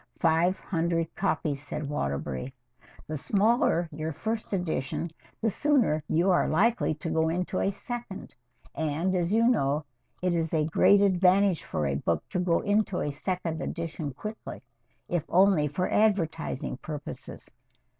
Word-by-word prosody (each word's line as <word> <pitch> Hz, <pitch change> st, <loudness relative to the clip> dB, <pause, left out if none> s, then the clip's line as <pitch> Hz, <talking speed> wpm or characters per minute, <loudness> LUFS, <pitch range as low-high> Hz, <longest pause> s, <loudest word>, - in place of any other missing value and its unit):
"Five 170 Hz, +3 st, +2 dB
hundred 165 Hz, -2 st, -1 dB
copies," 155 Hz, -7 st, -1 dB
said 145 Hz, 0 st, -5 dB
Waterbury. 70 Hz, -, -3 dB, 0.5 s
"The 155 Hz, -, -4 dB
smaller 200 Hz, -, +2 dB
your 155 Hz, +1 st, -4 dB
first 220 Hz, +8 st, -4 dB
edition, 170 Hz, -3 st, -2 dB, 0.3 s
the 225 Hz, -, +1 dB
sooner 240 Hz, -, +2 dB
you 175 Hz, +4 st, +2 dB
are 175 Hz, -, +3 dB
likely 205 Hz, 0 st, +2 dB
to 155 Hz, +2 st, -5 dB
go 160 Hz, 0 st, +2 dB
into 180 Hz, +2 st, -1 dB
a -, -, +2 dB
second, 235 Hz, -1 st, -7 dB, 0.4 s
and, 160 Hz, +4 st, -1 dB
as 175 Hz, -1 st, 0 dB
you 230 Hz, +2 st, +4 dB
know, 150 Hz, -, +1 dB, 0.3 s
it 180 Hz, -1 st, 0 dB
is 165 Hz, -1 st, 0 dB
a 155 Hz, -1 st, +2 dB
great 200 Hz, +5 st, +5 dB
advantage 190 Hz, -1 st, +4 dB
for 75 Hz, -, -2 dB
a 70 Hz, -, 0 dB
book 75 Hz, +3 st, -1 dB
to 180 Hz, -, -2 dB
go 180 Hz, -2 st, +2 dB
into 205 Hz, -2 st, +1 dB
a 145 Hz, -, -1 dB
second 165 Hz, +1 st, -3 dB
edition 165 Hz, -3 st, -4 dB
quickly, 215 Hz, -, -8 dB, 0.4 s
if 175 Hz, -4 st, -1 dB
only 185 Hz, -4 st, +4 dB
for 180 Hz, +6 st, -1 dB
advertising 165 Hz, -11 st, 0 dB
purposes. 150 Hz, 0 st, -8 dB
170 Hz, 145 wpm, -28 LUFS, 155-195 Hz, 0.5 s, great